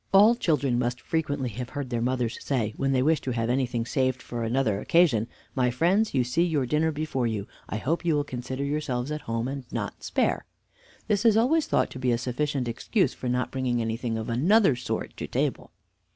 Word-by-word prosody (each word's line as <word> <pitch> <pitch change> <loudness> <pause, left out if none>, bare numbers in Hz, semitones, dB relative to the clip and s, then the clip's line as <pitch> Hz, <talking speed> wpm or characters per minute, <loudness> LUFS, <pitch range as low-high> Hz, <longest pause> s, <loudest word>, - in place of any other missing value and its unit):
All 205 +4 +7
children 145 - +1
must 120 0 -1
frequently 145 -5 -1
have 120 +3 -6
heard 140 -3 -5
their 120 -1 0
mothers 125 -1 -1
say, 115 -6 -1
when 135 0 0
they 130 -1 +2
wish 155 +2 +3
to - - -4
have 115 0 0
anything 125 -3 0
saved 130 0 0
for 120 -1 -6
another 115 -3 +1
occasion, 135 -7 +3 0.3
"My 125 -2 +2
friends, 175 - +2
you 130 - +4
see 125 +8 0
your 155 -6 +1
dinner 155 +5 +1
before 145 -5 -1
you; 105 -3 -2 0.2
I - - -2
hope 155 +11 -1
you 165 -3 +2
will 145 - +1
consider 130 0 -5
yourselves 140 -2 -2
at 150 0 -3
home 115 +1 -1
and 135 0 -4
not - - -4
spare." - - 0 0.6
This 210 -1 +1
is 225 -2 +5
always 290 +8 +3
thought - - +1
to 130 - -7
be 125 -1 +1
a 120 - +2
sufficient 130 +2 -1
excuse 180 - 0
for 125 - -4
not 125 0 0
bringing 130 -2 0
anything 115 0 -2
of 110 - -4
another 150 - +4
sort 120 - -4
to - - -4
table. - - -1
130 Hz, 210 wpm, -27 LUFS, 120-150 Hz, 0.6 s, All